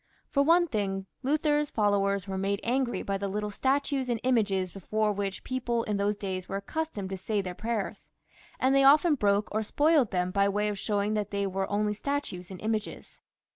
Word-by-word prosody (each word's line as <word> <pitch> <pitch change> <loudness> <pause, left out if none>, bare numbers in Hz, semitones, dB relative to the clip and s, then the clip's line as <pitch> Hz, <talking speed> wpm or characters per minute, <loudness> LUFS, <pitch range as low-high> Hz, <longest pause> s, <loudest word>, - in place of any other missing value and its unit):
For 280 - +3
one 335 +4 +5
thing, 195 - -2 0.2
Luther's 295 +1 +1
followers 200 -2 +1
were 190 - -3
made 200 +1 0
angry 250 0 0
by 195 0 -2
the 200 - -2
little 210 +1 -3
statues 270 +2 0
and 235 -2 0
images 205 -7 +1
before 210 +3 -1
which 200 -1 -3
people 240 -2 -1
in 210 -2 -1
those 205 +1 0
days 190 -3 -4
were 195 - -3
accustomed 200 -2 -4
to 190 - -3
say 205 +3 -1
their 185 -2 -3
prayers; 220 +1 -4 0.5
and 260 +1 +3
they 275 0 +5
often 300 +4 +6
broke 205 -5 +1
or 215 - 0
spoilt 290 +2 +3
them 180 0 -1
by 200 +1 +3
way 210 +1 0
of 205 -1 -4
showing 205 +1 0
that 210 -2 -1
they 200 0 -1
were 195 0 -2
only 210 +1 +1
statues 215 -7 -3
and 190 -2 -8
images. 215 -1 -4
210 Hz, 195 wpm, -28 LUFS, 195-260 Hz, 0.5 s, often